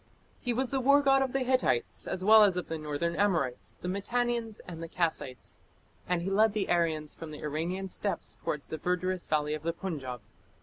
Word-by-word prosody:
He 245 - -2
was 250 +2 -1
the 270 - +1
war 280 +3 +5
god 270 -1 +5
of 265 -1 0
the 270 - 0
Hittites 255 - +1
as 185 0 -2
well 215 +1 +9
as 195 -3 +4
of 180 - -4
the 160 -1 -3
northern 155 +3 -2
Amorites, 170 -12 0
the - - -4
Mitannians, 230 +3 -1
and 165 -2 -7
the 165 - -5
Kassites; 160 -7 -3 0.5
and 175 -1 +1
he 190 - -1
led 215 +2 +4
the 210 -2 -1
Aryans 160 -3 +1
from 165 - -8
the 150 - -9
Iranian 170 +6 -3
steppes 200 - -2
towards 150 -1 -4
the 160 - -3
verdurous 180 +1 -1
valley 150 -1 +1
of 155 - -3
the 165 +2 -1
Punjab. 140 - -5
180 Hz, 205 wpm, -30 LUFS, 155-220 Hz, 0.5 s, well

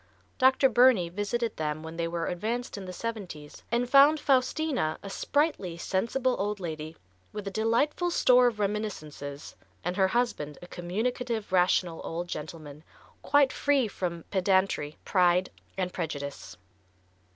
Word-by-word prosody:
Dr. 260 +1 +5
Burney 245 -8 +4
visited 210 +5 -2
them 155 0 -3
when 160 0 -7
they 165 0 -1
were 165 0 -2
advanced 225 +8 -3
in 200 -2 -7
the 185 - -6
seventies 180 -8 -6
and 240 +1 +1
found 285 +4 +6
Faustina 260 - +1
a 200 - -7
sprightly, 285 - 0
sensible 240 +9 0
old 205 +1 -1
lady, 160 -2 -6 0.3
with 210 -1 -6
a - - -3
delightful 235 - +1
store 250 -7 +5
of 225 -3 -2
reminiscences, 155 -9 -4 0.3
and 180 +1 -2
her 190 -1 +4
husband 190 -10 -1
a - - -11
communicative, 220 +6 -3
rational 180 -2 +2
old 170 +2 -4
gentleman, 155 -2 -7 0.4
quite 285 -2 +3
free 280 -4 +2
from 170 -4 -4
"pedantry, 190 -6 +1
pride 180 -1 +3 0.3
and 180 -1 -2
prejudice." 145 -5 -5
195 Hz, 140 wpm, -28 LUFS, 170-245 Hz, 0.4 s, found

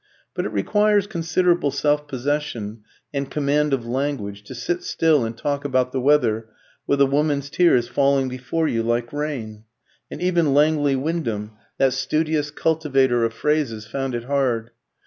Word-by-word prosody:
But - - -2
it - - -1
requires 205 - +2
considerable 175 -4 +1
self 145 +2 0
possession 130 -6 -3 0.3
and 140 -1 -2
command 150 +1 +1
of 130 -4 0
language 120 -5 -3
to 130 - -9
sit 175 +9 -2
still 155 -5 +2
and 115 0 -4
talk 140 +3 -2
about 130 -2 +1
the 130 - -2
weather 120 -6 +2 0.4
with 140 - +2
a - - +7
woman's 145 0 0
tears 140 -10 +3
falling 135 +1 +2
before 130 +6 -2
you 115 -5 0
like 120 +2 -1
rain; 125 -8 -4 0.5
and - - -7
even 170 -5 +2
Langley 145 -1 +3
Wyndham, 130 -8 -2 0.3
that 135 -2 +3
studious 155 -1 0
cultivator 135 -6 +1
of 115 - +1
phrases, 140 -8 -1
found 135 +2 -3
it 120 - -3
hard. 125 -4 0
140 Hz, 155 wpm, -22 LUFS, 120-150 Hz, 0.5 s, a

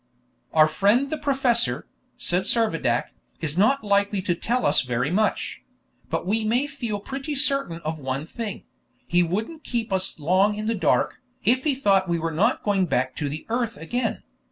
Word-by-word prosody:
"Our 155 -1 +6
friend 205 - +2
the 310 - -1
professor," 265 -5 +1 0.3
said 180 +2 0
Servadac, 165 - +1 0.3
"is 155 -2 -3
not 220 +9 +3
likely 200 0 +2
to 180 - +1
tell 240 +8 -1
us 145 - +4
very 125 +3 -1
much; 215 +4 0 0.5
but - - -2
we 220 +4 +1
may 240 +6 +2
feel 245 -8 -4
pretty 270 +7 -5
certain 275 - +1
of 155 0 -4
one 135 +1 -3
thing: 215 +4 -6 0.4
he 175 +1 +3
wouldn't 220 - -2
keep 230 -4 -2
us 190 0 -1
long 185 +7 +3
in 215 +1 -4
the 225 - +1
dark, 200 - +1 0.2
if 255 +3 +2
he 290 -3 +2
thought 195 -7 +2
we 170 - +2
were 165 0 -2
not 210 +11 +1
going 195 -3 +2
back 130 -4 0
to 145 - -1
the 150 +2 -6
earth 230 0 -1
again. 240 +10 -2
205 Hz, 180 wpm, -24 LUFS, 165-240 Hz, 0.5 s, Our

